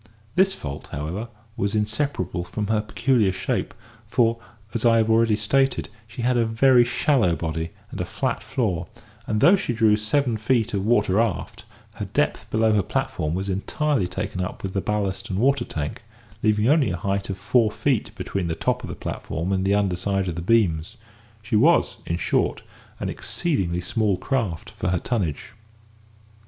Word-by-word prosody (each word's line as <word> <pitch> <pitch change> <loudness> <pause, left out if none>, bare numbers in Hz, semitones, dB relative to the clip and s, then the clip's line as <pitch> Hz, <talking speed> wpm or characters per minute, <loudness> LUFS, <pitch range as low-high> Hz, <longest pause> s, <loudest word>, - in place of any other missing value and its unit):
This 190 +4 +3
fault, 70 0 -7
however, 85 +11 -4 0.3
was 100 +2 -1
inseparable 105 - -1
from 105 +4 -4
her 110 0 +1
peculiar 110 -1 +2
shape, 95 +1 -2 0.4
for, 115 -1 +2 0.3
as 115 - -2
I 115 -1 +5
have 110 0 +3
already 110 -1 +4
stated, 135 +5 +1 0.2
she 120 +2 -6
had 125 0 +2
a 120 - +4
very 120 +2 +5
shallow 120 - +2
body, 80 0 -3 0.2
and - - -4
a - - -1
flat - - -2
floor; 100 -10 -1 0.4
and 105 -1 0
although 180 - +8
she 155 -10 -2
drew 110 -2 +4
seven 110 +3 0
feet 110 0 +1
of 100 -2 0
water 105 -3 +3
aft, 115 0 -2 0.3
her - - -3
depth - - -1
below 110 0 +3
her 105 - +4
platform 80 -2 -2
was 95 +2 -3
entirely 100 +4 0
taken 90 - -4
up 90 - -5
with 95 -1 -3
the 95 - 0
ballast 100 -2 -2
and 95 - -2
water 130 +2 +2
tank, 75 -2 -4 0.4
leaving 105 0 +2
only 145 0 +4
a 90 - -2
height 100 +1 -2
of 95 - -3
four 115 0 +3
feet 125 +2 0
between 95 -3 -3
the 80 - -1
top - - 0
of - - -6
the - - -5
platform 85 +3 -4
and 95 -1 +1
the 100 +1 +3
under 100 -3 +1
side 95 +1 -1
of 90 - -1
the 85 - -5
beams; 95 0 +1 0.5
she 110 - -1
was, 155 +11 +4
in 85 - 0
short, - - 0 0.4
an - - -2
exceedingly 95 - -1
small 100 +1 0
craft 110 - -2
for - - -4
her 90 +1 +2
tonnage. 95 - -2
105 Hz, 180 wpm, -24 LUFS, 95-120 Hz, 0.5 s, although